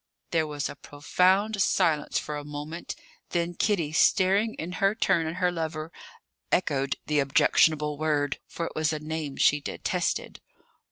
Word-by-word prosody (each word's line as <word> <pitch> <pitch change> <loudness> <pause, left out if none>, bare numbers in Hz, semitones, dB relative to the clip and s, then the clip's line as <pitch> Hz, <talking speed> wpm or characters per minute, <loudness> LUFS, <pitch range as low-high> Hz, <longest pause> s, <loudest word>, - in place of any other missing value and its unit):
There 160 -2 +1
was 145 -1 -3
a - - -8
profound 190 +9 +1
silence 155 -4 +2
for 150 - -3
a 145 - -5
moment; 150 +3 -6 0.3
then 170 0 -1
Kitty, 175 -5 0
staring 195 +6 +3
in 165 +3 -5
her 195 +2 +3
turn 165 -6 +1
at 160 - -4
her 180 -1 +1
lover, 160 -1 -4 0.6
echoed 140 -7 +1
the 150 -1 +1
objectionable 150 +2 +3
word; 145 -3 0
for 170 - -4
it - - -5
was 155 -1 +1
a 155 - -2
name 155 -2 -5
she 145 0 +4
detested. - - -3
155 Hz, 155 wpm, -27 LUFS, 150-175 Hz, 0.6 s, she